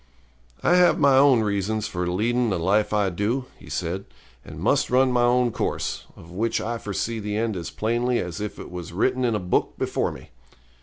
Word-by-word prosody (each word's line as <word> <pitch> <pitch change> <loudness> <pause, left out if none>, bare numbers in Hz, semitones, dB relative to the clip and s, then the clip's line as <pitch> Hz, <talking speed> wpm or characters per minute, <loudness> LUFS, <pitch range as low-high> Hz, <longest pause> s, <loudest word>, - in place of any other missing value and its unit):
'I 175 - +4
have 180 -1 +5
my 140 -2 +5
own 135 -3 +6
reasons 105 +1 -1
for 90 -1 -3
leading 115 +7 +1
the 95 - 0
life 100 +5 +1
I 105 -3 +1
do,' 110 +8 -1
he - - -13
said, 90 +3 -3 0.4
'and - - -10
must - - +2
run 130 +1 +3
my 125 -1 +2
own 120 0 +3
course, - - -3
of 80 - -14
which 110 +5 -1
I 115 +1 -3
foresee 110 +3 -3
the 105 0 -3
end 110 -1 -1
as 85 -3 -5
plainly 120 +3 0
as 90 0 -4
if 105 - -5
it - - -9
was 90 -2 -7
written 125 +7 +1
in 120 -3 +1
a - - 0
book 90 -1 -1
before - - -1
me. - - -12
110 Hz, 205 wpm, -24 LUFS, 95-125 Hz, 0.4 s, own